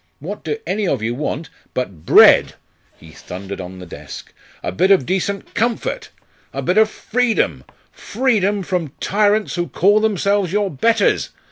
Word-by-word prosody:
What - - -7
do 440 - -2
any 205 -1 -1
of 130 -9 -1
you 115 +2 -1
want, 150 +4 -4 0.2
but 95 -11 -5
bread - - +6 0.2
" - - -38
He 80 - -14
thundered 95 +4 -8
on 90 +1 -9
the 90 - -9
desk 85 - -10 0.2
" - - -28
a - - -2
bit 140 - +1
of 190 -10 +4
decent 190 +3 -2
comfort 235 +1 -2 0.4
a - - -5
bit - - +2
of 220 0 +4
freedom 240 +1 -1 0.3
freedom 205 -5 0
from 175 -6 -3
tyrants 210 +1 +1
who 175 -1 -2
call 205 +4 +3
themselves 200 -3 +1
your 205 0 0
betters! 225 - +1
195 Hz, 165 wpm, -19 LUFS, 130-215 Hz, 0.4 s, bread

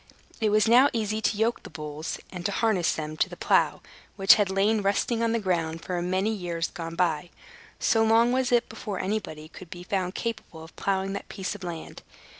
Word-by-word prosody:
It 220 - +2
was 215 +1 +3
now 250 +5 +6
easy 215 -1 -1
to 215 - 0
yoke 225 +2 +1
the - - -11
bulls, 150 0 -5
and 180 -2 -6
to - - -3
harness 200 -5 +1
them 155 -1 -5
to - - +1
the - - -9
plow, - - +2 0.3
which 195 -1 +7
had 205 -2 +2
lain 205 +3 +2
rusting 205 +4 0
on 230 -1 +2
the 230 - +1
ground 165 -5 -1
for 180 - -3
a 175 - -1
great 175 - -3
many 190 +4 +1
years 170 -4 -3
gone 165 -3 -6
by; 170 -2 0 0.5
so 225 -1 +3
long 225 +2 +4
was 255 0 +1
it 240 -1 +3
before 205 -4 -6
anybody 185 -6 -3
could 175 +2 -12
be 175 +1 -8
found 185 0 -2
capable 220 -8 -5
of 160 - -14
plowing 195 0 -1
that 200 - -6
piece 195 -1 -4
of 205 -2 -10
land. 170 -2 -7
195 Hz, 220 wpm, -26 LUFS, 175-220 Hz, 0.5 s, which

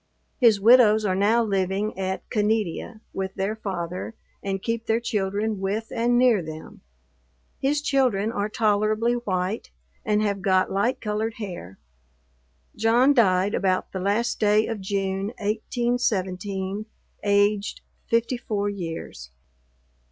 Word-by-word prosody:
His 230 -6 +5
widows 220 -1 +6
are 190 - +1
now 210 +5 +3
living 195 0 -1
at 190 0 -3
Caneadea 215 0 -1
with 190 0 -4
their 195 +3 -1
father, 185 0 -5 0.3
and 195 -1 -2
keep 230 +3 -3
their 225 +1 +2
children 210 -1 -1
with, 205 +4 -3
and 240 +1 +2
near 245 -5 +4
them. 155 -1 -9 0.8
His 290 +2 0
children 245 -8 +1
are 205 -2 -2
tolerably 215 +2 +1
white, 200 -3 -2 0.3
and 210 -1 +1
have 200 -2 -1
got 185 0 +2
light 205 +6 0
colored 220 +1 -2
hair. 175 - -7 1.0
John 235 +6 +4
died 195 -5 +3
about 185 -1 0
the 190 - -4
last 205 +5 0
day 210 +1 +3
of 225 -3 -4
June, 195 0 -2
1817, 205 -3 -2 0.4
aged 205 0 +1 0.3
54 230 -3 0
years. 165 - -6
210 Hz, 120 wpm, -24 LUFS, 195-225 Hz, 1.0 s, widows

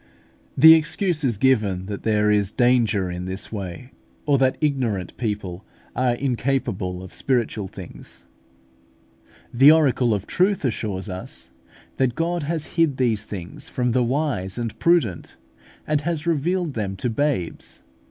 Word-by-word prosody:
The 160 +4 +10
excuse 165 +1 +1 0.2
given 105 -7 +2
is - - -9
that 100 0 -6
there 105 -1 +2
is 105 -2 +2
danger 115 -6 +2
in 90 0 -5
this 95 +2 -5
way, 100 +4 -6 0.3
or 145 -2 +3
that 130 -1 +2
ignorant 125 - -1
people 105 -5 -4 0.3
are 125 -1 +1
incapable 120 -8 -2
of 95 - -11
spiritual 115 -6 -1
things. - - -11 1.3
The 135 +5 +8
oracle 130 -7 +3
of 100 0 -5
truth 190 -3 +1
assures 105 -4 -2
us 95 -1 -8 0.5
that 130 -2 +1
God 170 +1 -1
has 160 +1 -3
hid 160 -6 +1
these 115 -5 0
things 90 -5 -8
from 125 -1 -1
the 125 +2 +2
wise 125 -7 -1
and 115 -2 -3
prudent, 170 - +1 0.5
and 150 -1 0
has 165 -1 -3
revealed 170 +1 0
them 100 -4 -3
to 95 - -3
babes. 125 - -2
120 Hz, 145 wpm, -23 LUFS, 100-145 Hz, 1.3 s, The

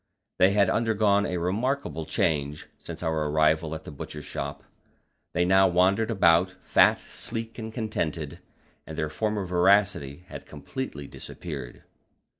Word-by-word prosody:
They 95 +1 +5
had 100 -2 +4
undergone 105 -3 +2
a 90 - -2
remarkable 90 - -1
change 75 -1 0
since - - -8
our 80 -2 0
arrival 80 +1 +2
at 80 - -8
the - - -9
Butcher's 75 +1 -8
Shop; - - -5 0.7
they 90 +1 +3
now 95 +1 +5
wandered 95 +5 +3
about, 90 -3 +4
fat, - - +5
sleek, 115 0 -6
and 110 0 -5
contented, 85 - -3 0.5
and 80 - -7
their 75 - -1
former 105 +6 -1
voracity 90 -4 +2
had - - -9
completely 75 - -6
disappeared. 70 -3 -8
90 Hz, 135 wpm, -27 LUFS, 75-105 Hz, 0.7 s, They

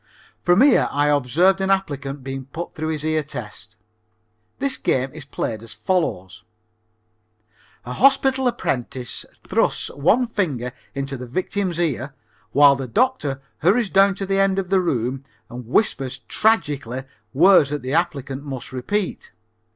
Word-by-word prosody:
From 180 +4 +4
here 280 +1 +5
I 145 +1 +2
observed 155 +8 +3
an 190 - 0
applicant 140 -8 -1
being 135 0 -5
put 165 +6 -7
through 155 0 -4
his 155 -1 -3
ear 155 0 +1
test. 110 -6 -9 0.8
This 275 0 0
game 130 +1 0
is 155 -2 -9
played 110 -6 -4
as 115 -1 -10
follows: 105 - -2 1.4
a 125 - -5
hospital 270 - +3
apprentice 125 - -3 0.2
thrusts - - +1
one 180 - +2
finger 150 - -2 0.2
into 140 0 -3
the 125 0 -8
victim's 185 +5 -2
ear 145 -5 -2 0.4
while 140 +1 +6
the 135 -1 -5
doctor 150 - 0 0.2
hurries 200 +5 +2
down 195 0 +5
to 195 - -4
the 195 0 0
end 195 -1 +2
of 195 -1 -2
the 190 -1 +4
room 130 -5 -1 0.3
and 120 -1 -8
whispers 135 - 0
tragically 145 - 0 0.3
words 165 +1 +5
that 145 -1 -4
the 130 +2 -3
applicant 140 -5 -1
must 135 -4 -6
repeat. 180 +10 -3
145 Hz, 145 wpm, -22 LUFS, 130-195 Hz, 1.4 s, while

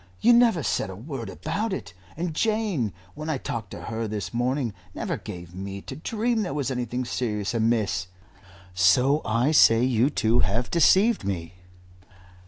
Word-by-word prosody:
You 240 +2 +5
never 235 -9 +4
said 105 - -1
a 95 - -7
word 120 - -6
about 220 +1 -3
it, 190 - -6 0.2
and 170 -1 -2
Jane, 210 - 0 0.2
when 155 +2 -6
I 155 - 0
talked 115 -3 -5
to - - -9
her 115 0 -3
this 100 -4 -4
morning, 125 -1 0 0.2
never - - -2
gave 85 -1 -9
me 95 +1 -6
to - - -7
dream 225 +7 -1
there 180 -8 -3
was 140 -3 -1
anything 125 0 -2
serious 105 -4 -2
amiss. 110 -6 +1 0.7
So 125 - +4
I 115 +6 +1
say 115 -6 +6
you 125 +1 +3
two 115 -4 +2
have 115 +3 0
deceived 195 +6 +4
me." 85 -4 -4
120 Hz, 165 wpm, -25 LUFS, 105-155 Hz, 0.7 s, say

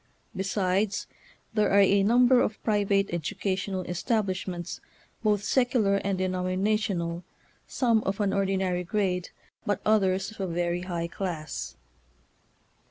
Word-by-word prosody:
Besides, 195 +1 0 0.5
there 215 -1 +2
are 200 - +5
a 200 0 +5
number 245 +4 +5
of 215 - -1
private 200 -2 +1
educational 185 +2 -2
establishments, 185 -2 -2 0.4
both 210 -2 +1
secular 240 -5 +2
and 200 -1 -1
denominational, 185 -1 -1 0.4
some 230 -4 +2
of 195 +2 -2
an 200 -2 +1
ordinary 190 -2 0
grade, 180 -1 -1 0.3
but 205 - 0
others 195 -2 +2
of 220 - -15
a 190 - -1
very 175 0 -1
high 175 -2 -3
class. 155 - -5
195 Hz, 115 wpm, -27 LUFS, 180-210 Hz, 0.5 s, are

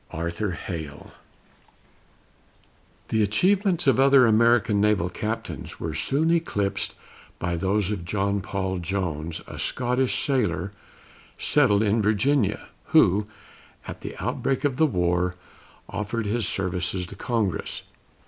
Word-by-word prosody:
ARTHUR 85 +5 -3
HALE. 80 -4 -7 2.0
The 110 - +1
achievements 180 - +2
of 135 -3 +4
other 135 -1 +6
American 110 -2 +4
naval 100 -4 +2
captains 110 +4 -5
were 80 -2 -3
soon 140 - +1
eclipsed 105 -11 0 0.4
by 90 0 -2
those 95 +3 0
of 95 -5 -3
John 100 +2 -1
Paul 95 -1 -3
Jones, 85 -3 -3
a - - -9
Scotch 125 +1 0
sailor, 115 - 0 0.7
settled 105 +1 +3
in 110 +1 +2
Virginia, 110 +3 +1 0.2
who, 100 +3 +4 0.6
at - - -7
the - - -7
outbreak 135 +1 -1
of 140 -3 0
the 160 - +4
war, 90 -4 0 0.5
offered 105 +2 -3
his 110 +1 0
services 90 -1 -1
to 95 - -10
Congress. 105 -6 -2
105 Hz, 120 wpm, -25 LUFS, 90-120 Hz, 2.0 s, other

